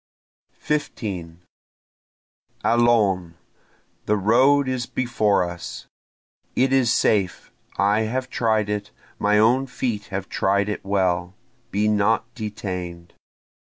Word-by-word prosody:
15 95 - -4 1.2
Allons! 105 -8 +2 0.7
the 105 - +2
road 130 +7 +4
is 130 -2 -2
before 110 -6 +1
us! 85 -1 -7 0.7
It 130 +1 +2
is 130 -4 +3
safe 100 -6 +1 0.3
I 100 +3 +3
have 130 +2 -2
tried 110 -3 +1
it 105 0 -3 0.3
my 105 +1 +3
own 125 +5 +3
feet 120 -5 -3
have 95 -1 -5
tried 100 +1 +1
it 105 - -4
well 95 -2 0 0.3
be 105 -1 0
not 105 +1 +2
detain'd! 90 -6 -6
105 Hz, 105 wpm, -23 LUFS, 95-120 Hz, 1.2 s, road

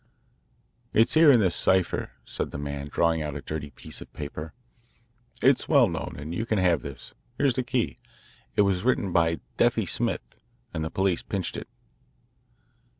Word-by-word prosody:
"It's 115 +2 +4
here 160 -1 +7
in 125 - +6
this 95 -4 +2
cipher," 95 -1 +2 0.2
said - - -3
the - - -6
man, 70 0 -4
drawing 85 -1 +2
out 75 -2 -4
a 70 - -5
dirty 75 -1 -5
piece - - -9
of - - -11
paper. 75 +2 -6 0.9
"It's 135 0 +4
well 140 -6 +6
known, 85 -3 -4
and 75 +4 -6
you 100 - -1
can 110 -2 0
have 90 -6 +3
this. 70 -2 -8 0.2
Here's 140 -3 +3
the 130 - 0
key. 125 -1 -1 0.6
It - - +5
was 95 -2 +1
written 115 -6 +1
by 85 -1 +2 0.2
'Deafy' - - +3
Smith, - - -2 0.3
and 80 - -2
the 80 - -2
police 95 -1 +1
pinched 95 -4 -3
it." - - -6
85 Hz, 170 wpm, -27 LUFS, 75-110 Hz, 0.9 s, here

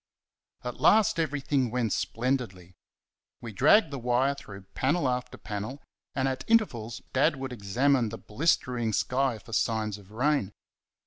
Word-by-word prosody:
At 125 -1 -5
last 215 -5 +5
everything 140 -4 0
went 115 -3 0
splendidly. 115 -8 -2 0.7
We 115 - -7
dragged 150 - +5
the 140 - -4
wire 125 +3 +2
through 100 -8 -11
panel 140 +3 +1
after 125 0 -2
panel, 105 +6 -5 0.4
and 135 0 +1
at 130 0 -2
intervals 120 - +1
Dad 145 +4 +3
would 135 -1 -5
examine 120 +4 +1
the 115 - -6
blistering 120 -3 0
sky 130 +3 +1
for 115 +2 -13
signs 110 -2 0
of 100 -1 -17
rain. 125 -2 0
125 Hz, 140 wpm, -28 LUFS, 110-140 Hz, 0.7 s, last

